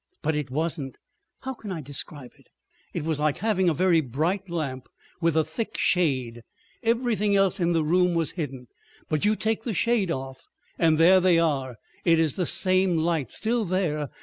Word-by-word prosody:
But 160 - 0
it 150 -3 -3
wasn't. 150 -1 -2 0.4
How 265 0 -4
can 215 -5 -9
I 175 - -4
describe 145 -2 -6
it? - - -24 0.4
It - - -4
was 160 -1 -2
like 150 -1 +1
having 190 -3 +1
a - - +1
very 175 -1 +3
bright 165 - -2
lamp 140 -7 -4 0.3
with 165 -1 +2
a 160 - +4
thick 160 +9 -5
shade—everything 200 - -1
else 195 0 +2
in 175 -1 +1
the 165 -1 +1
room 180 +2 +2
was 165 -2 0
hidden. 135 -7 -5 0.4
But 155 +4 0
you 215 +1 +3
take 220 +1 -1
the 225 -3 -4
shade 230 -4 +1
off 135 -3 -5 0.3
and 160 -2 +3
there 180 +4 +6
they 180 -2 +4
are—it 145 +1 0
is 160 -3 +1
the 180 -3 -1
same 185 -2 +2
light—still 170 - 0
there! 165 -6 -1
165 Hz, 175 wpm, -25 LUFS, 150-190 Hz, 0.4 s, there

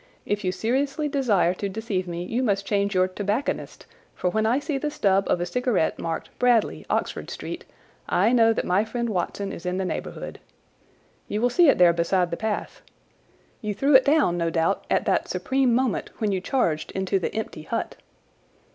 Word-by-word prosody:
If 205 0 -1
you 185 - +1
seriously 275 - -1
desire 245 - +2
to 200 +2 -4
deceive 195 -3 -3
me 170 0 -4
you 230 +7 -2
must 200 -5 0
change 200 -1 0
your 185 0 +4
tobacconist; 205 +7 -3 0.3
for 180 - -1
when 220 +2 +1
I 240 +3 +3
see 285 -1 -2
the 300 - -1
stub 195 -7 +2
of - - +2
a 175 - -1
cigarette 245 -5 0
marked 165 -1 -4
Bradley, 245 -3 +2
Oxford - - -2
Street, - - -6 0.4
I 200 +6 +3
know 230 -2 +5
that 225 - -1
my 185 +3 +2
friend 235 +1 -3
Watson 195 +1 -2
is - - -8
in 180 0 -2
the 190 - -1
neighbourhood. - - -5 0.9
You 210 - -2
will 245 +2 +2
see 340 +3 +5
it - - +4
there 175 -1 +6
beside 170 +1 +1
the - - -1
path. 215 +3 -3 0.8
You 210 -3 -3
threw 280 +7 +2
it 265 0 +8
down, 280 - +3
no 170 0 +1
doubt, 165 +4 0
at - - +1
that - - +1
supreme 265 -2 +1
moment 255 -2 0
when 215 -2 0
you 190 -2 -1
charged 175 - 0
into 190 0 0
the 180 - -3
empty 220 -7 -4
hut." 155 - -3
205 Hz, 190 wpm, -25 LUFS, 185-245 Hz, 0.9 s, it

